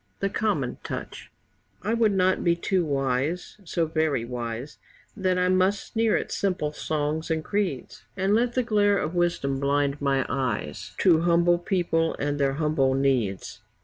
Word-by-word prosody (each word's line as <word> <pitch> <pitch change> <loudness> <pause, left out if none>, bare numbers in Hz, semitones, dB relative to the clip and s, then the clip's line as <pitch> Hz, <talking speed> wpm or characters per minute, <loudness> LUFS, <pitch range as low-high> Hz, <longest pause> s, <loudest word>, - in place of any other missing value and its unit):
THE 195 - 0
COMMON 195 - -1
TOUCH - - -6 0.5
I 215 +3 0
would 230 -2 +3
not 185 -1 +2
be 170 -1 +3
too 180 +1 0
wise 140 +4 -1
so 165 0 0
very 155 -6 0
wise 120 +2 -5 0.4
That 185 -3 0
I 180 0 +2
must 185 +2 +1
sneer 225 -1 +2
at - - -4
simple 185 -6 -1
songs 155 +1 -2
and 160 -1 0
creeds, 195 - -2 0.2
And 195 +2 +1
let 235 +2 +2
the 255 - +2
glare 205 -3 +3
of 155 -1 -2
wisdom 170 -6 0
blind 140 +1 0
my 135 -2 +1
eyes 110 - -3
To 165 -4 +5
humble 175 0 +3
people 170 -3 0
and 145 +1 -2
their 135 -1 +2
humble 145 -3 +1
needs. 130 -8 -1
160 Hz, 160 wpm, -26 LUFS, 140-185 Hz, 0.5 s, To